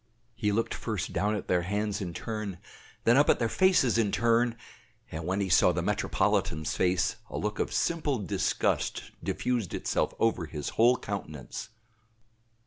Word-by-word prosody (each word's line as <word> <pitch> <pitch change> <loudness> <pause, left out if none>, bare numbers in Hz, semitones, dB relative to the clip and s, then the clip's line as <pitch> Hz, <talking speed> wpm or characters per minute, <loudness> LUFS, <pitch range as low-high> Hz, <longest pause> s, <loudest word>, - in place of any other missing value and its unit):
He 110 -2 0
looked 115 +3 0
first 105 -4 -3
down 105 +1 +1
at 100 - -5
their 90 -1 +2
hands 105 +3 -2
in 90 -3 -3
turn, 105 -4 -4 0.5
then 120 +3 +5
up 145 - +5
at - - +5
their 115 - 0
faces 180 -7 +3
in 105 -3 +2
turn, 115 +1 +2 0.5
and 80 +1 -5
when 95 +2 0
he 100 - 0
saw 90 - +5
the - - -2
metropolitan's 80 0 0
face 90 -1 +1
a - - -5
look 105 0 -2
of - - -1
simple 155 -5 0
disgust 100 -6 -1
diffused 120 -8 -1
itself - - -1
over 105 -7 +1
his 75 -1 -4
whole 120 +3 +4
countenance. 75 - -6
105 Hz, 160 wpm, -29 LUFS, 90-115 Hz, 0.5 s, then